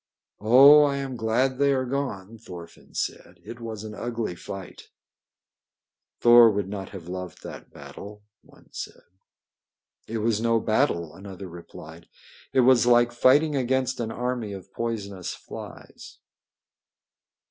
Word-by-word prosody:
"Oh, 135 +7 +8
I 145 -1 +2
am 135 -2 -4
glad 125 +4 0
they 140 0 +3
are 130 -1 0
gone!" 115 -6 -4
Thorfinn 85 -6 -12
said. - - -4
"It 120 - -9
was 110 -3 -7
an 110 -1 -7
ugly 115 -2 -4
fight." 95 +2 -10 1.3
"Thor 120 -1 +8
would 100 -2 -2
not 95 -1 -6
have 90 -4 -10
loved 90 -1 -7
that - - -10
battle," 105 +1 -11 0.2
one - - -22
said. - - -8 1.0
"It 115 - -4
was 110 0 0
no 115 0 +2
battle," 110 - 0
another 95 -1 -9
replied. 85 -1 -12 0.4
"It 130 - +3
was 125 -1 +5
like 120 0 +5
fighting 145 +5 +3
against 130 0 0
an 115 -2 -2
army 120 -3 -3
of 95 -2 -11
poisonous 100 -6 -4
flies." - - -11
115 Hz, 135 wpm, -25 LUFS, 100-125 Hz, 1.3 s, Oh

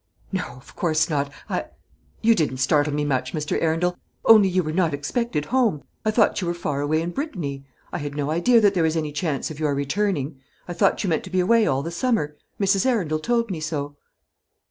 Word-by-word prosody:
"No, 190 -2 -1
of 125 - -16
course 160 -1 +1
not. 140 -1 0 0.2
I - - -2 0.6
you 230 +1 +6
didn't 150 - 0
startle 145 +2 +2
me 145 0 -1
much, 130 -2 -1
Mr. 150 -1 -1
Arundel; 165 +2 +1 0.3
only 215 -4 +7
you 185 0 +1
were 155 - -3
not 165 -3 +1
expected 150 - -2
home. 230 - +1 0.2
I 215 - +1
thought 210 -1 +3
you 180 - -2
were 175 - -1
far 145 -4 -2
away 155 +2 +1
in 175 - -3
Brittany. 155 - -4 0.3
I - - -2
had 145 -1 -5
no 145 0 -1
idea 175 +9 +4
that 205 -2 +4
there 180 - +1
was 160 0 +1
any 155 -2 -2
chance 150 -1 -2
of 155 - -9
your 150 -2 +1
returning. 140 -1 -1 0.3
I 175 - -4
thought 195 +4 +2
you 195 - 0
meant 160 - 0
to - - -8
be 185 0 0
away 220 +4 +4
all 135 +1 +1
the 165 - -4
summer 170 - 0 0.2
Mrs. 195 +3 +2
Arundel 180 -12 +1
told 230 +4 0
me 170 - -3
so." 145 -2 -3
160 Hz, 215 wpm, -23 LUFS, 145-195 Hz, 0.6 s, only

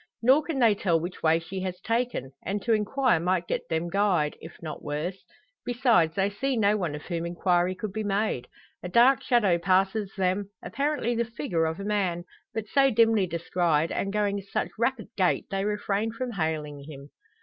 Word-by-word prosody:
Nor 265 +5 +6
can 315 -2 -4
they 230 -4 +5
tell 175 -5 +1
which 175 +3 -6
way 160 0 +4
she 170 +3 -6
has 185 -1 -4
taken; 230 - -2
and 200 +3 -2
to 230 - +2
inquire 220 0 +2
might 180 +1 0
get - - -3
them 160 +1 -1
"guyed," 180 -5 +1
if 160 - -11
not 155 -2 -7
worse. 155 +6 -4 0.4
Besides, 230 -10 +2
they 195 0 +2
see 255 +6 -2
no 210 -1 +3
one 175 -8 -2
of 150 - -8
whom 170 -1 -3
inquiry 175 +1 +1
could 200 +1 -5
be 220 - -2
made. 205 - -1 0.3
A 180 - -5
dark 245 +7 +5
shadow 205 -9 +3
passes 195 +3 +1
them, 190 +1 0
apparently 285 -4 -1
the 235 0 +1
figure 220 - -2
of 160 +2 -3
a - - -5
man; 190 -5 0 0.3
but 220 -1 -4
so 275 +5 +4
dimly 225 -4 +3
descried, 170 -1 0
and 195 - -2
going 205 -1 0
in 195 - -11
such - - -2
rapid 235 -1 0
gait, 185 -3 +1
they 195 0 -1
refrain 210 +1 -1
from 245 +2 -4
hailing 155 -6 -3
him. 140 -1 -11
195 Hz, 195 wpm, -27 LUFS, 170-225 Hz, 0.4 s, Nor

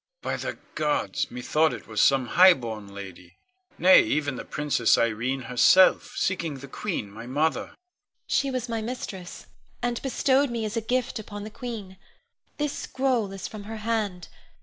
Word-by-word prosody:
By - - -1
the - - -5 0.2
gods! 270 - -1
methought 150 +6 +1
it - - -8
was 110 -2 -1
some 135 -3 +3
highborn 120 - +4
lady, 95 -3 -10 0.4
nay, 185 +1 +7
even 145 -3 -1
the - - -6
Princess 145 -6 +2
Irene 120 +4 0
herself, 125 +10 +4
seeking 170 -5 -1
the 135 +1 -9
queen, 135 - -4
my 115 +3 -9
mother. 150 +5 0
Ione. - - -19 0.5
She 275 - +1
was 255 -2 -3
my 230 -1 -2
mistress, 215 -6 -6 0.3
and 240 -1 -2
bestowed 270 +1 +2
me 230 -2 -2
as 215 +1 -4
a 230 - 0
gift 250 +1 -1
upon 205 -1 -7
the 215 - -8
queen. 210 -5 -7 0.6
This 295 -1 -1
scroll 255 -6 -1
is 195 -1 -6
from 210 -2 -9
her 220 +1 -6
hand. 210 -6 -2
185 Hz, 165 wpm, -26 LUFS, -, 0.6 s, nay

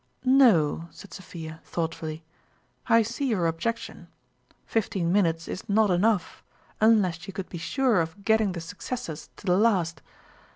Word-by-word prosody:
" - - -22
No," 210 - +4
said 200 - -13
Sophia, 165 -4 -9
thoughtfully; 160 -1 -4 0.3
" - - -35
I 230 - +5
see 240 +6 -3
your 205 -8 +1
objection 220 +3 -3 0.6
fifteen 190 -6 -1
minutes 165 -4 +1
is 190 - -7
not 210 0 +3
enough, 190 +1 +1 0.4
unless 205 -6 +3
you 195 - -7
could 190 0 -6
be 175 - -6
sure 235 +3 +2
of 165 +5 -6
getting 220 -3 +3
the 170 - -5
suc 180 +4 -10
cessors 165 -11 -5
to - - -15
the 180 -1 +3
last. 180 -8 +2
190 Hz, 160 wpm, -26 LUFS, 165-220 Hz, 0.6 s, I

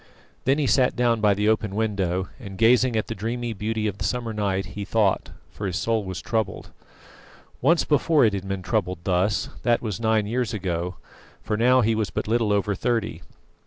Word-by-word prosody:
Then 135 +3 +3
he 150 - +1
sat 125 +1 +3
down 120 -2 +2
by 105 -2 +4
the 105 +2 0
open 110 -2 +1
window, 95 -4 -1
and 100 -6 -9
gazing 120 +2 +4
at 110 - 0
the - - -4
dreamy 115 +3 -3
beauty 110 +1 -2
of 100 -2 -2
the - - -3
summer 120 -3 -2
night, 100 -3 -1
he 105 - -4
thought, 100 -1 +1 0.2
for 100 - -5
his 90 - -3
soul 115 -2 0
was 95 -1 -6
troubled. 110 -2 -2 0.9
Once 170 0 +4
before 150 -1 +3
it 105 - +2
had 95 -1 -4
been 95 -1 -3
troubled 90 -3 -1
thus; 95 +2 +1
that 120 -1 +2
was 105 -6 -4
nine 110 -2 +2
years 115 +1 -1
ago, 90 -2 -2 0.5
for 110 - -1
now 125 +3 +4
he 115 0 +2
was 110 -2 -1
but - - -3
little 115 -1 +1
over 100 0 +1
thirty. 110 -4 -1
110 Hz, 200 wpm, -24 LUFS, 95-115 Hz, 0.9 s, by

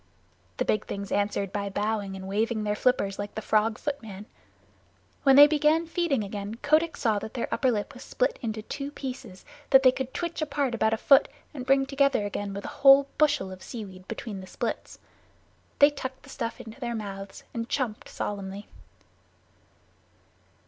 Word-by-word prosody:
The - - 0
big 215 - 0
things 200 -1 -5
answered 200 -1 0
by 200 -1 -2
bowing 205 -1 -2
and 190 0 -7
waving 215 +2 0
their 210 0 0
flippers 205 -5 +1
like 205 0 -5
the - - -2
Frog 215 +1 +2
Footman. 220 -10 -5 1.0
When 270 -2 +5
they 290 +1 +11
began 305 +2 +3
feeding 325 -8 0
again 205 +1 -5
Kotick 310 +6 +1
saw 220 -4 +1
that 220 - -8
their 240 - -2
upper 260 - +2
lip 210 -4 -2
was - - -12
split - - -1
into 220 -2 -4
two 280 +5 -5
pieces 255 -9 -8 0.2
that 265 0 +7
they 255 - +7
could 260 0 -4
twitch 340 +1 -4
apart 285 -4 -1
about 220 -1 +2
a - - -7
foot 275 +5 +5 0.3
and 260 -3 -7
bring 270 0 +4
together 275 -5 +2
again 205 0 -4
with 200 0 -6
a - - -7
whole 275 0 +7
bushel 295 -10 +2
of 185 0 -10
seaweed 190 -6 -9
between 215 -3 -6
the 185 - -11
splits. - - -4 0.8
They 285 +1 +7
tucked 260 -2 -7
the - - -15
stuff 230 - -4
into 225 +4 -10
their 240 -2 -3
mouths 195 -2 -7
and 230 0 -4
chumped 245 -6 -2
solemnly. 200 0 -5
230 Hz, 175 wpm, -27 LUFS, 205-275 Hz, 1.0 s, they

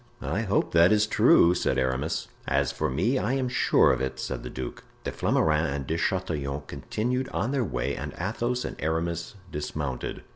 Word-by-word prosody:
"I - - -1
hope - - +1
that 85 +2 +6
is 105 0 +4
true," 85 -4 +5
said 65 -6 0
Aramis. 65 +4 -1 0.2
"As 70 0 +2
for 70 - -1
me, 120 - +1
I 125 - 0
am 135 -1 0
sure 125 - +4
of 65 - -2
it," 65 0 -3
said 65 - -3
the - - -6
duke. 65 -1 -6 0.2
De - - -2
Flamarens 80 +1 +2
and 70 -2 -4
De 80 - -1
Chatillon 75 -6 -1
continued 125 +4 -2
on 110 +7 -1
their 135 -3 +1
way 95 - -2
and - - -5
Athos 125 +1 -1
and - - -5
Aramis 85 +4 -2 0.2
dismounted. 75 -3 -4
80 Hz, 185 wpm, -27 LUFS, 70-110 Hz, 0.2 s, that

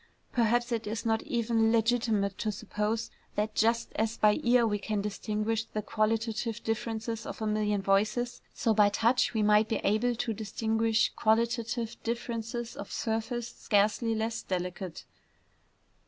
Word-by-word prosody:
Perhaps 240 +1 +2
it 225 -2 -1
is 225 +2 -3
not 225 -1 +2
yet - - -12
even 225 -1 +2
legitimate 225 -4 +2
to 215 - 0
suppose 220 +1 -2 0.2
that, 215 +1 -1
just 230 +2 +1
as 225 +1 -1
by 210 +4 +4
ear 240 -1 +4
we 210 -2 0
can 210 +1 -2
distinguish 215 +2 -2
the 215 -1 -4
qualitative 225 +1 -1
differences 225 0 -2
of - - -6
a 220 - -2
million 210 -2 0
voices, 210 +5 +1
so 225 - +1
by 210 -1 +5
touch 230 +4 +2
we 215 - +2
might 210 +1 +4
be 225 - +1
able 220 +4 +2
to 225 0 -2
distinguish 220 +1 +1
qualitative 230 +1 0
differences 235 0 -3
of - - -8
surface 225 +1 -2
scarcely 215 +2 +1
less 220 +1 -2
delicate. 180 -1 -4
225 Hz, 150 wpm, -30 LUFS, 210-230 Hz, 0.2 s, by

